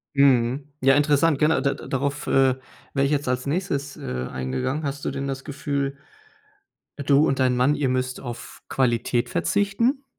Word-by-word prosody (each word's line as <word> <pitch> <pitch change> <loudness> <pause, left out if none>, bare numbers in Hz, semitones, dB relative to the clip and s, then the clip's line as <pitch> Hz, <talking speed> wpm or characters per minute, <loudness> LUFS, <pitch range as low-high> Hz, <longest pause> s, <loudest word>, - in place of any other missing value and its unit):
Mhm. 135 0 +3
Ja, 135 +1 +5
interessant. 145 +1 +3
Gena 150 -2 +3
da 140 0 +1
da - - -10
darauf, 140 +2 -2
äh, 135 -1 +4 0.4
wäre 140 -1 +2
ich 140 - 0
jetzt 145 -2 0
als 125 0 -1
Nächstes, 140 -3 -2
äh, 65 0 -4
eingegangen. 130 - -2
Hast 140 0 -4
du - - 0
denn 140 0 -4
das 135 0 -5
Gefühl 140 -1 -2 1.0
du 140 +2 +4
und 135 - 0
dein 130 -1 +3
Mann, 130 +4 +3
ihr 140 -3 0
müsst 130 0 -1
auf 120 -2 -8
Qualität 120 -1 +1
verzichten? 230 - 0
140 Hz, 170 wpm, -24 LUFS, 130-145 Hz, 1.0 s, Ja